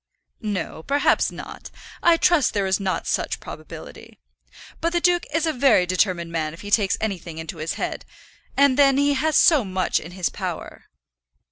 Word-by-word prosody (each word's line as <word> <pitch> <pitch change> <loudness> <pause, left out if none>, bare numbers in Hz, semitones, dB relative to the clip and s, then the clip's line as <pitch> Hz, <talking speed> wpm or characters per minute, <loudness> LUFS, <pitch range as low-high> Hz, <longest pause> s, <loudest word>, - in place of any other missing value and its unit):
"No; 205 -7 -4
perhaps 285 - +2
not. - - -9 0.3
I 340 -1 +5
trust 340 -8 +3
there 200 -1 +1
is 190 +1 +1
no 190 -1 -1
such - - -2
probability. - - -11 0.6
But 335 +1 -1
the 345 - +2
duke 350 0 +2
is 325 +2 +1
a 320 - 0
very 250 -8 +4
determined 180 -2 0
man 160 -1 -2
if - - -13
he 205 - -8
takes 200 -3 +2
anything 180 -6 -4
into 160 +1 -6
his 155 +1 -3
head; - - -4 0.5
and 280 -1 +4
then 275 -1 +5
he 285 0 +3
has 310 +3 0
so 310 -7 +5
much 185 -2 0
in 170 +3 -10
his 185 -2 -1
power." - - -6
210 Hz, 175 wpm, -23 LUFS, 180-285 Hz, 0.6 s, I